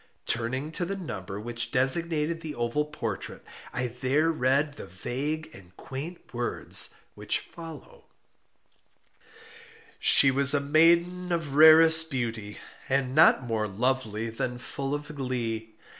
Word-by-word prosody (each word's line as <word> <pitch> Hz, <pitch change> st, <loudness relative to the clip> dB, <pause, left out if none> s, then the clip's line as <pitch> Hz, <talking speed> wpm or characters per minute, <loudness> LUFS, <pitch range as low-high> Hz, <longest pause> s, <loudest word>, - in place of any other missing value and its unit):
Turning 130 Hz, +6 st, -2 dB
to 175 Hz, -, -3 dB
the 195 Hz, +3 st, -3 dB
number 100 Hz, -, -7 dB
which 120 Hz, +2 st, -4 dB
designated 155 Hz, +4 st, +1 dB
the 155 Hz, -3 st, -7 dB
oval 120 Hz, +5 st, -1 dB
portrait, 115 Hz, -9 st, -6 dB, 0.3 s
I 130 Hz, -, -2 dB
there 130 Hz, +6 st, 0 dB
read 140 Hz, +1 st, 0 dB
the -, -, -10 dB
vague 140 Hz, -, -5 dB
and 90 Hz, -1 st, -16 dB
quaint 145 Hz, +4 st, -9 dB
words 120 Hz, 0 st, +1 dB, 0.2 s
which -, -, -2 dB
follow: 170 Hz, -, -12 dB, 1.9 s
"She 135 Hz, -, +7 dB
was 140 Hz, +2 st, +2 dB
a -, -, +2 dB
maiden 170 Hz, +5 st, +3 dB
of 165 Hz, -5 st, -2 dB
rarest 160 Hz, +2 st, +7 dB
beauty, 115 Hz, -6 st, -4 dB, 0.3 s
and 130 Hz, -1 st, 0 dB
not 150 Hz, -3 st, +5 dB
more 110 Hz, -3 st, -2 dB
lovely 115 Hz, 0 st, -2 dB
than 125 Hz, +2 st, -4 dB
full 135 Hz, +3 st, -4 dB
of 150 Hz, +1 st, -7 dB
glee. 115 Hz, -5 st, -4 dB
135 Hz, 130 wpm, -27 LUFS, 120-155 Hz, 1.9 s, She